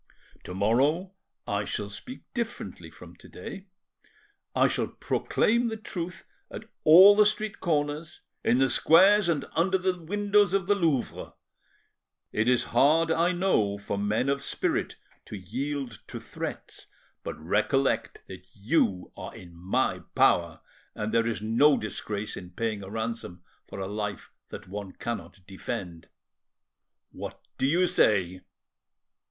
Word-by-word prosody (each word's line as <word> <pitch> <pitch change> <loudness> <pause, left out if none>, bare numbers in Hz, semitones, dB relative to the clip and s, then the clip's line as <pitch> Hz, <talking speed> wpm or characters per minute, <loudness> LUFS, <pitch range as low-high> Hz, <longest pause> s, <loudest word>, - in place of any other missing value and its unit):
To 90 - -7
morrow 140 - +1 0.3
I 100 0 -1
shall 105 0 -3
speak 250 - -9
differently 235 -2 -5
from - - -14
to - - -16
day: 195 +1 -9 0.9
I - - +5
shall - - -1
proclaim 235 +2 0
the 220 -1 -3
truth 180 -5 -6 0.2
at - - -8 0.2
all 185 +6 +9
the 210 - +6
street 215 0 -1
corners, 155 0 -2 0.2
in 120 - +3
the 135 0 +4
squares, 180 +9 +5
and 155 -4 0
under 190 +4 +2
the 185 0 0
windows 205 +2 +2
of 195 -2 0
the 205 - +3
Louvre. 165 -10 -1 1.0
It 110 +3 +1
is 125 -1 +3
hard, 160 +6 +4
I 170 +2 +2
know, 175 - +1
for 100 0 -4
men 105 +5 0
of 140 0 0
spirit - - -1 0.3
to 105 - -7
yield 125 +5 -4
to - - -7
threats, - - -7 0.4
but - - -5
recollect 105 - 0
that - - -11
you 100 - 0
are - - -8
in 85 -2 -12
my 90 +3 0 0.2
power 85 -2 +3 0.3
and 105 0 -3
that 115 - +4
there 115 - -2
is 110 - -5
no 130 +7 +4
disgrace 105 0 -4
in 90 - -9
paying 110 +2 -3
a 95 - -8
ransom 110 -5 -5 0.2
for - - -8
a 95 - -3
life 105 0 -5 0.2
that - - -9
one 100 0 -7
cannot 115 -5 -6
defend. 95 -3 -6 1.0
What - - -8 0.2
do 130 - +2
you 175 +6 +3
say?" 95 - +2
130 Hz, 145 wpm, -27 LUFS, -, 1.0 s, all